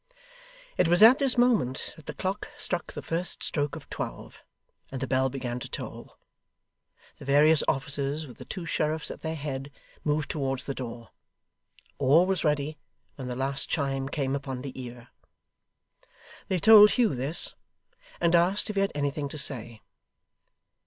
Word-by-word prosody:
It - - +3
was 175 +4 +5
at 245 +6 +8
this 270 -3 +2
moment 225 - +1
that 160 - -16
the - - -6
clock 190 +2 -3
struck 175 -3 -3
the - - -7
first 170 +2 -3
stroke 145 -2 -1
of - - -10
twelve, - - -6 0.5
and 135 - -4
the 135 - -2
bell 130 0 +1
began 125 -2 -4
to - - -8
toll. - - -8 1.0
The - - -10
various 150 +2 +5
officers, 140 +2 -1
with 125 -5 -13
the - - -9
two 180 -3 -6
sheriffs 155 -1 -1
at - - -9
their 160 0 -3
head, 140 -2 -5 0.3
moved 150 0 0
towards 135 -3 -2
the 140 - -4
door. 115 -3 -7 0.9
All 145 +6 +5
was 190 0 0
ready 150 0 0 0.3
when 130 -2 -7
the 125 - -4
last 135 +2 -1
chime 135 -2 -1
came 140 -2 -1
upon 135 -2 -5
the 130 -1 -7
ear. 120 -1 -10 1.4
They 185 - 0
told 210 +3 +9
Hugh 240 -4 +2
this, 135 +6 0 0.7
and 170 0 +2
asked 180 +5 +3
if 205 - -7
he - - +3
had 195 - +1
anything 145 0 -2
to 155 - -7
say. 120 -5 0
145 Hz, 165 wpm, -27 LUFS, 135-170 Hz, 1.4 s, told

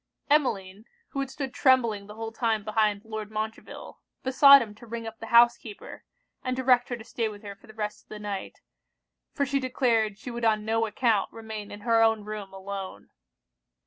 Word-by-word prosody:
Emmeline, 210 -8 +1 0.2
who 275 - -5
had 275 -1 -2
stood 270 -1 -5
trembling 235 -7 +2
the 210 - -10
whole 225 0 -5
time 225 -2 0
behind 215 -1 0
Lord 220 -1 -6
Montreville, 220 +1 -6 0.2
besought 275 +2 +8
him 210 -2 -10
to 225 +3 -15
ring 230 0 -5
up 225 0 -8
the 225 - -7
housekeeper, 235 -2 +2 0.4
and 255 -1 -1
direct 250 -2 +3
her 245 - -3
to 225 - -11
stay 225 -1 -2
with 205 0 -11
her 200 -1 -7
for 195 - -21
the 220 - -13
rest 210 -1 -5
of - - -49
the 215 - -7
night; 205 -2 -6 0.7
for 280 - 0
she 275 +1 0
declared 235 -5 +1
she 250 - -8
would 235 0 -6
on 215 -2 +2
no 225 +1 +1
account 220 -2 +1
remain 220 -2 -7
in 205 - -9
her 230 0 +3
own 225 -2 +3
room 210 -2 -6
alone. 195 0 -7
220 Hz, 195 wpm, -27 LUFS, 210-240 Hz, 0.7 s, besought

